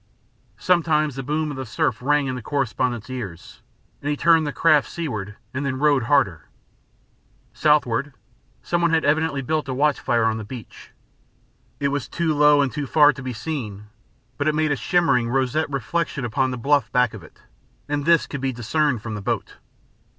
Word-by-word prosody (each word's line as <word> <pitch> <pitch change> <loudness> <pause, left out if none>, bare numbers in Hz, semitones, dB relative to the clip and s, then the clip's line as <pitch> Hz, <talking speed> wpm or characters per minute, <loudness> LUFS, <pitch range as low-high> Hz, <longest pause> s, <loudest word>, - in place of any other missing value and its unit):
Sometimes 155 -5 +1
the 135 - -4
boom 150 +3 -2
of 140 - -7
the 130 - -3
surf 110 -1 -1
rang 145 +2 +2
in 130 - -2
the 125 - -5
correspondent's 125 -3 -2
ears, 110 -10 -8 0.4
and 145 - -3
he 145 - -1
turned 165 -1 +4
the - - -2
craft 150 -2 +3
seaward 110 - -5 0.2
then 130 +3 -3
and 130 -1 -2
rowed 145 -5 +3
harder. 115 - +1 1.0
Southward, 145 -3 +2 0.5
some 175 0 0
one 170 - +3
had 165 -2 +1
evidently 150 -1 +1
built 155 +1 -1
a 130 - -2
watch 145 +1 +2
fire 115 -2 +1
on 110 0 0
the - - -5
beach. 115 +1 -10 0.9
It 140 - +1
was 140 -3 -3
too 165 -2 0
low 150 -1 +5
and 135 - -1
too 145 -2 -4
far 150 +1 +5
to 135 - -9
be 130 -1 -4
seen, 105 -5 -5 0.5
but 145 - 0
it 155 - +2
made 155 -1 +1
a - - +2
shimmering, 135 -7 +1
roseate 135 +4 0
reflection 140 +1 -2
upon 130 +3 0
the 125 - -4
bluff 140 +3 +1
back 125 -3 +2
of 110 - -9
it, 80 - -18 0.4
and 145 0 -1
this 170 +1 +4
could 140 - -6
be 135 -1 0
discerned 120 +1 0
from 110 - -5
the 105 - -5
boat. - - -3
140 Hz, 190 wpm, -22 LUFS, 120-150 Hz, 1.0 s, low